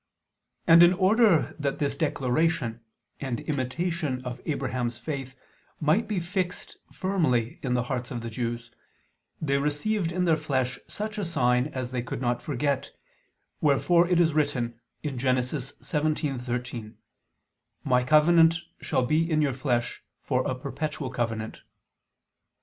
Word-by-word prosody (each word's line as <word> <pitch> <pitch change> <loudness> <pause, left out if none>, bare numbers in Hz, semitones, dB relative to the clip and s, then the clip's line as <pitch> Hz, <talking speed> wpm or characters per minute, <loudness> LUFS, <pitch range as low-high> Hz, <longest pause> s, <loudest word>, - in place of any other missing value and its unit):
And 165 +1 +8
in 175 +1 +8
order 195 -1 +4
that 140 -2 -1
this 140 -1 -1
declaration, 140 -3 0 0.4
and 130 -4 -3
imitation 145 0 -2
of 125 0 -5
Abraham's 125 -6 -1
faith, 130 +1 -5 0.4
might 160 +9 +2
be 205 -3 -1
fixed 180 +1 -3
firmly 150 - 0
in 125 -2 0
the 125 - +1
hearts 125 -1 -3
of 120 - -4
the 115 - -5
Jews, 115 0 -4 0.7
they 140 -3 +1
received 165 +6 0
in 180 +1 0
their 165 -2 +4
flesh 130 -4 -1
such 215 +1 -5
a - - -1
sign 125 -7 +2
as 130 -4 -5
they 125 -1 -1
could 120 - -5
not 120 -1 0
forget, 140 -1 -1 0.7
wherefore 170 +4 +4
it 180 -1 +3
is 165 -3 +4
written 125 -6 0 0.2
(Gen. 140 -5 -3 0.2
17:13): 125 - -2 0.9
"My 125 0 +3
covenant 160 +4 +5 0.2
shall 130 -4 0
be 160 +5 +2
in 155 -2 +2
your 140 -3 +1
flesh 120 -2 -1 0.2
for 130 -2 +1
a 130 - -1
perpetual 140 +1 -4
covenant." 110 -2 -3
140 Hz, 135 wpm, -27 LUFS, 125-165 Hz, 0.9 s, And